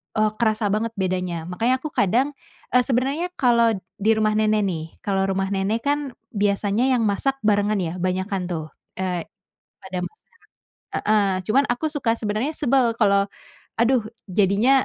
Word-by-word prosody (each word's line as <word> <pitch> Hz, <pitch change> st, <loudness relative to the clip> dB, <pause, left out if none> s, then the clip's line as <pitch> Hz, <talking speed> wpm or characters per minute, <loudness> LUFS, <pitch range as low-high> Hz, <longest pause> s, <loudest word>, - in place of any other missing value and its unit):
eee, 215 Hz, -1 st, +2 dB
kerasa 215 Hz, -3 st, +1 dB
banget 225 Hz, +2 st, -1 dB
bedanya. 180 Hz, -3 st, -2 dB
Makanya 225 Hz, +9 st, +1 dB
aku 290 Hz, +4 st, -6 dB
kadang, 250 Hz, +8 st, +2 dB, 0.4 s
eee, 250 Hz, -, +5 dB
sebenarnya 270 Hz, +7 st, 0 dB
kalau 235 Hz, -3 st, +3 dB, 0.2 s
di 215 Hz, +3 st, +1 dB
rumah 215 Hz, 0 st, +2 dB
nenek 215 Hz, 0 st, +2 dB
nih, 170 Hz, -5 st, -2 dB, 0.2 s
kalau 195 Hz, -1 st, +1 dB
rumah 195 Hz, 0 st, -1 dB
nenek 200 Hz, +4 st, 0 dB
kan, 285 Hz, -2 st, -1 dB, 0.2 s
biasanya 205 Hz, +3 st, +1 dB
yang 235 Hz, -, +1 dB
masak 220 Hz, +6 st, +1 dB
barengan 210 Hz, 0 st, +2 dB
ya, 160 Hz, -, -2 dB
banyakan 185 Hz, 0 st, -1 dB
tuh, 165 Hz, -3 st, -3 dB, 0.3 s
eee, 180 Hz, -3 st, -2 dB, 0.6 s
pada 185 Hz, -1 st, -4 dB
masak 435 Hz, -, -28 dB, 0.7 s
heeh, 215 Hz, -1 st, +2 dB, 0.2 s
cuman 275 Hz, +6 st, +3 dB
aku 245 Hz, +6 st, -1 dB
suka 230 Hz, -6 st, 0 dB
sebenarnya 215 Hz, +6 st, -1 dB
sebel 265 Hz, -2 st, +3 dB
kalau, 200 Hz, -2 st, +3 dB, 0.5 s
aduh, 245 Hz, +1 st, +4 dB, 0.4 s
jadinya 205 Hz, +6 st, +4 dB
215 Hz, 150 wpm, -23 LUFS, 195-240 Hz, 0.7 s, eee